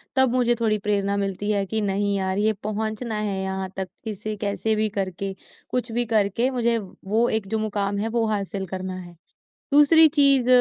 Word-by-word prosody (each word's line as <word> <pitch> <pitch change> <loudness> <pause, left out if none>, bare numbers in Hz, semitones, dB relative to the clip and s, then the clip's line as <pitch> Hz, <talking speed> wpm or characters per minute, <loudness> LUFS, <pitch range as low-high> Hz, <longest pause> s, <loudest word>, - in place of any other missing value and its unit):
तब 265 -2 +6
मुझे 240 -1 +3
थोड़ी 215 -2 +2
प्रेरणा 200 -1 0
मिलती 200 +1 -2
है 200 -1 0
कि 220 +3 -1
नहीं 200 0 0
यार 190 0 -1
ये 215 +1 +2
पहुँचना 215 +2 -3
है 205 -2 -2
यहाँ 190 0 -3
तक, 190 -1 -3 0.2
किसे 215 -1 -5
कैसे 210 +2 0
भी 215 0 +1
करके, 195 +1 -3 0.4
कुछ 245 -2 -2
भी 240 +1 +1
करके 220 +3 +1
मुझे 235 -2 +1 0.3
वो 225 +4 +2
एक 220 -3 -1
जो 220 +2 -1
मुक़ाम 205 -2 -2
है 210 - -1
वो 230 0 0
हासिल 200 -2 -2
करना 185 0 -5
है। 175 -1 -10 0.6
दूसरी 315 +3 +7
चीज़ 280 -4 +5
215 Hz, 185 wpm, -23 LUFS, 195-230 Hz, 0.6 s, दूसरी